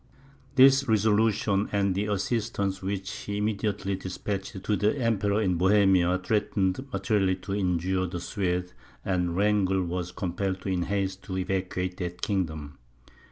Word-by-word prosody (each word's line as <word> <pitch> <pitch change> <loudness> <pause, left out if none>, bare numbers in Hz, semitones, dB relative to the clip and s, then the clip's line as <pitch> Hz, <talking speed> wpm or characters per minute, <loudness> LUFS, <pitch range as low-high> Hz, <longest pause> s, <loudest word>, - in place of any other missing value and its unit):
This 135 +1 +6
resolution, 105 -2 +2
and 100 -2 +1
the 100 +3 -1
assistance 100 -2 -1
which 95 +1 -3
he 100 -1 -5
immediately 105 -2 -1
despatched 95 +2 -5
to 105 - +1
the 105 +7 +1
Emperor 105 -4 +1
in 90 -5 +1
Bohemia, 95 -2 +4
threatened 105 +3 0
materially 100 -5 +1
to 95 +1 -6
injure 95 -1 0
the 85 0 -5
Swedes, 90 0 -2 0.3
and 90 -2 0
Wrangel 100 -2 +2
was 90 0 -3
compelled 95 +1 -3
in 95 -2 0
haste 95 -1 -1
to 95 -2 -4
evacuate 95 -1 -2
that 90 -1 -4
kingdom. 80 -8 -2
95 Hz, 135 wpm, -27 LUFS, 90-105 Hz, 0.3 s, This